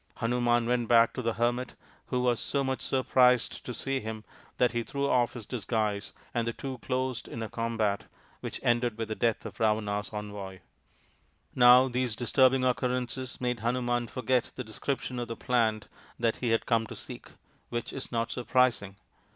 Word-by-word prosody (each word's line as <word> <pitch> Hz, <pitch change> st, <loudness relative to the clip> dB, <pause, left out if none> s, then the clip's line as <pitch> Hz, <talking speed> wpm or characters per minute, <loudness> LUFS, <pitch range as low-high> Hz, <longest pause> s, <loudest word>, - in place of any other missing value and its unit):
Hanuman 120 Hz, 0 st, +1 dB
went 120 Hz, -1 st, +1 dB
back 115 Hz, 0 st, +5 dB
to 125 Hz, -, -3 dB
the 115 Hz, -2 st, 0 dB
hermit, 120 Hz, +2 st, 0 dB, 0.3 s
who 125 Hz, -1 st, 0 dB
was 125 Hz, -2 st, +2 dB
so 140 Hz, -1 st, -1 dB
much 130 Hz, -1 st, -2 dB
surprised 125 Hz, -2 st, +3 dB
to -, -, -5 dB
see 135 Hz, +2 st, -2 dB
him 110 Hz, -1 st, -6 dB, 0.3 s
that 125 Hz, -, +3 dB
he 120 Hz, -, -1 dB
threw 140 Hz, +4 st, -2 dB
off 125 Hz, -3 st, +2 dB
his 120 Hz, -4 st, -7 dB
disguise 110 Hz, -3 st, -2 dB, 0.2 s
and 115 Hz, -1 st, 0 dB
the 115 Hz, -, -1 dB
two 130 Hz, 0 st, -6 dB
closed 130 Hz, -1 st, -2 dB
in 115 Hz, -, -5 dB
a 110 Hz, -, -5 dB
combat 110 Hz, -3 st, -1 dB, 0.3 s
which -, -, -5 dB
ended 120 Hz, -1 st, +2 dB
with 115 Hz, -1 st, -3 dB
the 110 Hz, -, -2 dB
death 115 Hz, -1 st, 0 dB
of -, -, -8 dB
Ravana's 105 Hz, -2 st, 0 dB
envoy. 100 Hz, -3 st, -6 dB, 0.9 s
Now 125 Hz, +1 st, +7 dB
these 125 Hz, -3 st, -1 dB
disturbing 130 Hz, +2 st, +3 dB
occurrences 125 Hz, 0 st, -1 dB
made 125 Hz, -1 st, -1 dB
Hanuman 120 Hz, +1 st, 0 dB
forget 125 Hz, +1 st, 0 dB
the 130 Hz, -, -4 dB
description 125 Hz, +3 st, -3 dB
of 120 Hz, -, -3 dB
the 115 Hz, -, -4 dB
plant 110 Hz, -4 st, +1 dB, 0.3 s
that 115 Hz, -1 st, +1 dB
he 120 Hz, -, -1 dB
had 115 Hz, 0 st, +2 dB
come 115 Hz, -1 st, +2 dB
to -, -, -8 dB
seek -, -, -10 dB, 0.4 s
which 120 Hz, 0 st, -4 dB
is 135 Hz, -, -6 dB
not 115 Hz, -1 st, -1 dB
surprising. 120 Hz, -6 st, +1 dB
120 Hz, 175 wpm, -29 LUFS, 115-125 Hz, 0.9 s, Now